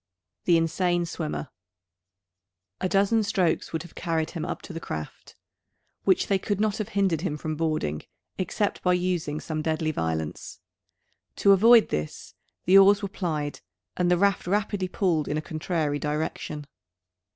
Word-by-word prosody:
THE 170 -2 +5
INSANE 175 +1 +1
SWIMMER. 160 -3 -4 1.3
A 185 - 0
dozen 200 +3 +3
strokes 190 -5 0
would 160 -1 -3
have 170 - -13
carried 165 -2 -2
him 165 -3 -4
up - - -4
to - - -9
the 165 - -4
craft; 75 - -7 0.7
which 190 - +3
they 195 -1 +1
could 205 +1 -2
not 215 -1 +1
have 215 - -3
hindered 185 -6 +2
him 165 -5 -2
from 155 +1 -4
boarding, 155 - -1 0.4
except 205 +3 -1
by 180 - +3
using 175 -4 -1
some 155 -1 -4
deadly 155 0 0
violence. 80 - -3 0.8
To 200 - +4
avoid 225 +4 +7
this, 75 0 -4 0.3
the 190 +2 +8
oars 200 +1 +6
were 200 - -2
plied; 155 -6 -3 0.4
and 180 -1 +1
the 180 - +4
raft 200 -1 +1
rapidly 205 -1 0
pulled 175 -5 0
in 150 - -1
a - - +1
contrary 155 -2 -2
direction. 150 0 -3
175 Hz, 155 wpm, -26 LUFS, 155-195 Hz, 1.3 s, the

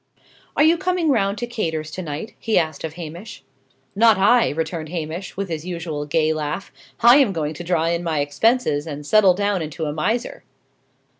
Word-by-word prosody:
"Are - - +5
you 330 +2 +4
coming 360 -3 0
round 200 -4 +1
to 240 - -3
Cator's, 160 -10 -3
to 185 - -5
night?" 155 +5 -6
he 225 - 0
asked 155 -3 -1
of 160 -2 -4
Hamish. 175 +5 -9 0.5
"Not 225 0 +5
I," 220 +5 +4
returned 160 0 -4
Hamish, 170 +2 -5
with 195 0 -2
his 160 -3 -4
usual 165 -4 -5
gay 155 +1 +2
laugh. 155 +5 -4 0.3
"I 240 +3 +8
am 270 -8 +4
going 155 -4 -2
to 175 - -8
draw 170 -2 +1
in 170 0 0
my 165 -3 -1
expenses, 150 - +1
and 150 -1 -6
settle 195 +1 +5
down 200 -1 0
into 160 +1 -4
a 150 - -2
miser." 220 +11 -2
170 Hz, 190 wpm, -21 LUFS, 155-215 Hz, 0.5 s, I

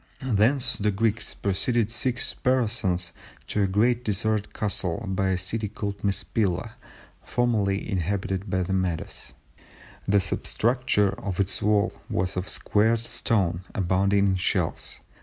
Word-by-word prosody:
Thence 125 +5 +3
the 105 +1 +1
Greeks 110 +2 0
proceeded 110 +3 0
six 125 +1 0
parasangs 110 -8 0 0.3
to 105 - -1
a 100 - +3
great 120 +5 +2
deserted 110 0 -1
castle 100 -1 -1
by 95 0 0
a 95 - +1
city 105 +4 -2
called 100 -1 -5
Mespila 100 0 0 0.5
formerly 110 -5 0
inhabited 95 0 -2
by 95 0 +1
the 95 +2 -2
Medes; 95 -3 -3 0.7
the 100 +1 +4
substructure 115 +1 +1
of 95 -2 -4
its 100 -1 0
wall 105 0 +2 0.2
was 90 +1 -1
of 90 +2 -3
squared 110 +2 +2
stone 105 -6 0
abounding 100 +1 +2
in 95 -1 +2
shells 90 - -1
100 Hz, 130 wpm, -26 LUFS, 95-115 Hz, 0.7 s, the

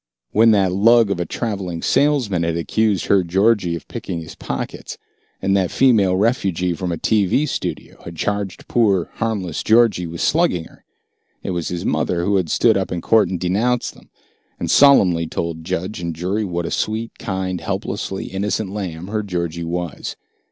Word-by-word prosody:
When 115 +2 +5
that 100 -4 +3
lug 110 +3 +4
of 95 - -1
a 85 - -2
traveling 95 -7 -4
salesman 130 - +2
had 85 0 0
accused 105 +2 0
her 95 -2 +3
Georgie 95 0 +2
of 85 - -9
picking 85 - -5
his 80 - -9
pockets, - - -6 0.5
and 95 0 +2
that 95 -3 +1
female 110 -8 +3
refugee 95 -5 +1
from 90 +1 -3
a 85 - -2
TV 110 - +2
studio - - -5
had 85 - -8
charged 100 +2 -3
poor 100 -7 +2
harmless 100 -9 -2
Georgie 110 -6 +3
with 85 0 -7
slugging 160 - +2
her, - - -18 0.6
it - - -3
was 85 -2 -2
his 90 -1 -4
mother 85 -1 0
who 100 -1 +2
had 90 -4 -1
stood 110 +4 +3
up 95 - -2
in 90 - -2
court 110 -2 +3
and 90 - -3
denounced 110 +8 0
them, - - -20 0.5
and - - -1
solemnly 90 - +5
told 80 0 -4
judge 95 +3 -3
and 85 -2 -4
jury 95 +6 -1
what 85 -2 -3
a - - -4
sweet, 110 +1 -2
kind, 95 -3 -3
helplessly 95 - -3
innocent 100 +1 -2
lamb 90 -5 -5
her 105 +1 -1
Georgie 85 -4 -3
was. 85 -2 -4
95 Hz, 175 wpm, -20 LUFS, 85-110 Hz, 0.6 s, When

